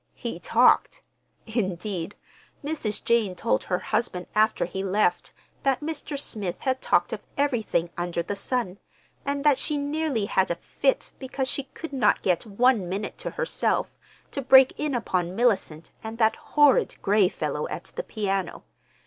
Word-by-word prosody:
He - - -5
talked—indeed, 195 -4 0 0.5
Mrs. 285 -9 -3
Jane 225 -6 +2
told 105 -11 0
her 180 - 0
husband 215 -4 -2
after 215 +1 +3
he 190 +2 -4
left 190 -2 +1 0.3
that 270 0 +1
Mr. 295 -2 -4
Smith 205 -10 -4
had 260 -1 0
talked - - +2
of - - -4 0.2
everything 230 - 0
under 175 -1 -2
the 205 - -4
sun, 200 -2 -2 0.5
and 280 0 -1
that 290 -3 +4
she 300 +1 0
nearly 285 -5 -1
had 190 -2 +1
a 170 - 0
fit 270 +9 -1
because 265 0 -3
she 275 0 -3
could 325 -3 -7
not 245 -6 +2
get 185 +4 +1
one 220 -2 +2
minute 200 +3 -4
to - - -3
herself - - -1 0.4
to 280 - -3
break 265 0 +7
in 300 -3 -1
upon 185 -6 -1
Mellicent 195 -9 0
and 220 +1 -6
that 220 -1 +3
horrid 295 -2 +3
Gray 200 -2 +4
fellow - - -3
at - - -7
the - - -1
piano. 195 - -3
220 Hz, 155 wpm, -26 LUFS, 190-270 Hz, 0.5 s, break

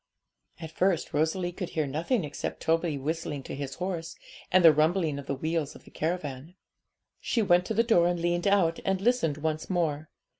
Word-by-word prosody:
At 160 -2 -7
first 185 0 0
Rosalie 160 +4 0
could 180 0 -5
hear 155 - +2
nothing 165 - -1
except 145 -1 -5
Toby 165 -2 +1
whistling 145 0 -3
to - - -7
his 135 -1 -5
horse, 175 -3 -4 0.4
and 185 -1 +5
the 160 - +9
rumbling 155 -1 +1
of 140 - -9
the 140 - -1
wheels 155 +1 -2
of - - -14
the - - -17
caravan. 155 -1 -4 0.6
She 230 - 0
went 180 -2 +4
to 220 - -2
the 230 - +4
door 200 -8 +4
and 175 0 0
leaned 175 +2 0
out, 185 -5 +3
and 190 -1 0
listened 195 - +1
once 155 0 -3
more. 155 -5 -1
165 Hz, 190 wpm, -28 LUFS, 150-180 Hz, 0.6 s, the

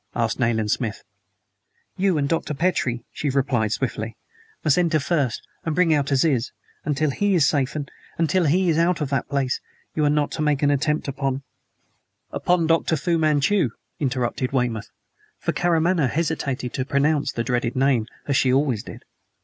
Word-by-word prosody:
asked 115 0 0
Nayland 110 -3 +1
Smith. 115 -4 -2 0.9
"You 190 -3 +2
and 140 -1 +1
Dr. 155 -1 -1
Petrie," 130 -8 0
she 145 - -2
replied 130 -5 +1
swiftly, 115 -2 -3 0.5
"must 155 +2 +3
enter 165 -3 +2
first, 140 -4 -1 0.2
and 160 -2 -2
bring 175 -2 +4
out 145 -2 +1
Aziz. 135 -3 +2 0.3
Until 150 0 0
he 200 +7 +1
is 155 -6 +4
safe 140 -1 0 0.4
until 170 +2 +2
he 180 +5 +3
is 165 -1 +3
out 170 +1 +2
of 145 -3 -3
that 135 -3 -1
place 135 -2 0 0.3
you 155 - 0
are 145 0 +2
to 155 - -4
make 150 -2 +1
no 145 0 +4
attempt 150 +2 0
upon 135 0 -2 0.5
" - - -47
"Upon 175 -2 +1
Dr. 165 0 +2
Fu 170 +3 0
Manchu?" 155 +1 +2 0.3
interrupted 130 -2 -1
Weymouth; 125 -5 -1 0.5
for - - -2
Karamaneh 170 -3 +2
hesitated 140 -5 -2
to 130 - -1
pronounce 140 +1 +1
the 120 -3 -2
dreaded 120 -1 -1
name, 130 -4 +2 0.2
as 140 - 0
she 130 -1 +3
always 130 -5 +2
did. - - -11
140 Hz, 165 wpm, -23 LUFS, 130-160 Hz, 0.9 s, bring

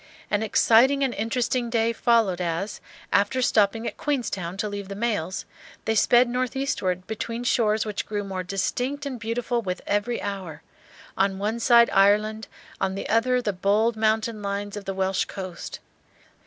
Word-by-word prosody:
An 205 - +2
exciting 240 +5 +4
and 260 -3 0
interesting 240 +2 -1
day 230 0 +1
followed 225 -7 +2
as, 175 +4 -3 0.3
after 205 +6 +2
stopping 225 -2 +2
at - - -4
Queenstown 200 - -2
to 210 - -1
leave 200 -1 -5
the 200 - -6
mails, 205 -5 -2 0.4
they 220 - +1
sped 240 +3 +5
northeastward 250 -7 -1
between 230 +3 -4
shores 220 -3 +2
which 210 -2 -4
grew 205 -1 -2
more 190 -2 -4
distinct 245 +10 -2
and 260 -4 -4
beautiful 235 +1 -1
with 185 -4 -3
every 205 +4 0
hour, 185 -6 -6 0.5
on 195 0 +1
one 215 +4 -2
side 235 0 +5
Ireland, 210 +2 +3 0.3
on 190 - -1
the 195 - -4
other 250 +3 +2
the 205 - -1
bold 210 +5 +2
mountain 220 0 0
lines 200 0 -3
of 205 -1 -7
the 195 - -3
Welsh 190 0 0
coast. 185 -3 -7
215 Hz, 160 wpm, -25 LUFS, 195-235 Hz, 0.5 s, sped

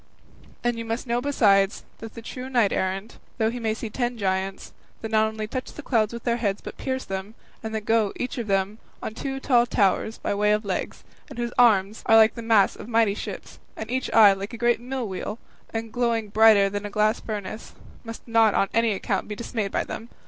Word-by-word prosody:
And 240 -1 0
you - - -3
must 225 +3 -3
know 240 0 0
besides, 205 -8 +3 0.2
that 225 -1 -9
the 230 - -9
true 255 +3 -7
knight 240 -6 +2
errant, 195 +4 -3 0.2
though 220 -1 +1
he 245 - -5
may 220 -2 -1
see 225 -1 -6
ten 240 +1 -2
giants, 190 -1 -2 0.3
that 220 - -5
not 220 0 +4
only 220 0 -4
touch 255 +4 -5
the 300 - -9
clouds 220 -6 +1
with 235 -1 -7
their 235 -1 +1
heads 205 -4 -1
but - - -9
pierce 260 0 -3
them, 195 +3 -5 0.3
and 220 0 -5
that 215 -1 -4
go, 225 -3 +2
each 250 0 -4
of 230 - -4
them, 195 +2 0 0.2
on - - -4
two 270 +3 -4
tall 245 -3 +3
towers 215 +1 +1
by - - -2
way 210 +1 +2
of 210 0 -1
legs, 190 -2 -3 0.3
and - - -10
whose 240 0 -3
arms 215 -4 +4
are 225 - +6
like 220 0 +6
the 235 - -7
masts 225 -3 +3
of - - -9
mighty 225 -3 +3
ships, 210 - -7 0.2
and 220 +1 -6
each 260 0 -2
eye 210 -3 +8
like 195 +4 -6
a - - -5
great 240 +1 +2
mill 255 -1 -4
wheel, 195 +3 -5 0.3
and 225 -1 -5
glowing 230 -3 0
brighter 215 -1 +6
than 205 +1 -4
a 205 - -4
glass 215 +2 +1
furnace, 215 0 -6 0.3
must 230 0 -9
not 225 -2 +4
on 195 - +2
any 230 -1 +2
account 195 0 -2
be 210 - -5
dismayed 215 -3 -3
by - - 0
them. 230 - -7
220 Hz, 225 wpm, -25 LUFS, 205-235 Hz, 0.3 s, eye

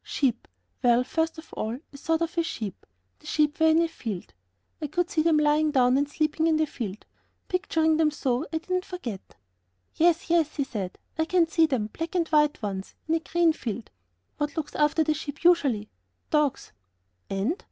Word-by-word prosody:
"Sheep. 250 -5 -1 0.3
Well, 245 0 +4
first 320 +5 -1
of 320 0 -12
all, 220 +3 -3 0.2
I - - -9
thought 325 +3 0
of 330 - -2
sheep; 215 - -6 0.3
the - - -15
sheep 300 0 +1
were 320 - +5
in 320 +1 +5
a - - +1
field. 210 - -6 0.5
I 300 - -1
could 345 +4 -1
see 315 - +2
them 320 -1 +4
lying 300 +1 +3
down 255 -3 +4
and 285 +1 +1
sleeping 310 +2 0
in 320 -1 +3
the 310 - +3
field; 215 -8 -6 0.4
picturing 320 -4 +1
them 315 -1 +4
so, 270 -2 -1
I 320 - 0
did 340 +3 -9
not 365 0 +1
forget." 245 - -7 0.6
"Yes, 340 +2 +3
yes," 325 -3 +2
he 280 - +1
said, 205 -8 -5 0.2
"I 320 - +3
can 345 0 +3
see 325 0 +3
them, 255 -8 0
black 330 +2 -5
and 340 -2 +2
white 300 -5 +3
ones! 195 -2 -4
in 320 - +1
a 330 - +3
green 335 0 +2
field." 230 -5 -5 0.5
"What 295 +2 -2
looks 315 - -3
after 300 +2 +3
the 310 0 +1
sheep 300 0 -7
usually?" 275 -12 +3 0.4
"Dogs." 300 -3 +1 0.6
"And?..." 200 - 0
305 Hz, 195 wpm, -26 LUFS, 255-325 Hz, 0.6 s, were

